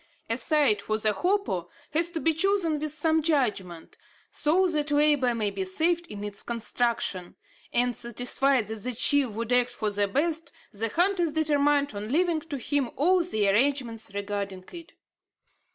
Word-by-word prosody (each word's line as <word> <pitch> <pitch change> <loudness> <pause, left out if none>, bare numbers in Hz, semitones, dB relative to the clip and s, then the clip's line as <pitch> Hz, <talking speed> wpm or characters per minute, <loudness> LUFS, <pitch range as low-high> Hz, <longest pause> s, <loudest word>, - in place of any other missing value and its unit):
A 230 - +1
site 260 -5 +2
for 215 +1 -1
the 215 -1 0
hopo 360 - -1 0.2
has 330 +3 +3
to 340 -1 -4
be 325 0 +2
chosen 335 -2 +1
with 305 0 -2
some 320 +1 +2
judgment, 210 - -2 0.3
so 345 +6 +2
that 305 -4 0
labour 290 -4 +3
may 210 -3 -1
be 195 -1 -3
saved 335 - +1
in 205 -9 -8
its 205 -1 -2
construction; 230 -5 -2 0.4
and, 245 0 +1
satisfied 245 +1 0
that 220 -2 -6
the 250 +1 -1
chief 285 +3 +3
would 225 +2 -5
act 245 0 +3
for 215 -2 -3
the 205 0 0
best, 320 +8 -2 0.2
the 225 +2 -1
hunters 350 - +1
determined 290 -3 +1
on 210 +2 -6
leaving 335 +1 +1
to 305 -2 -7
him 270 0 -1
all 360 +6 +3
the 215 - 0
arrangements 230 0 +1
regarding 200 -2 -4
it. 335 -2 -11
270 Hz, 165 wpm, -26 LUFS, 215-315 Hz, 0.4 s, has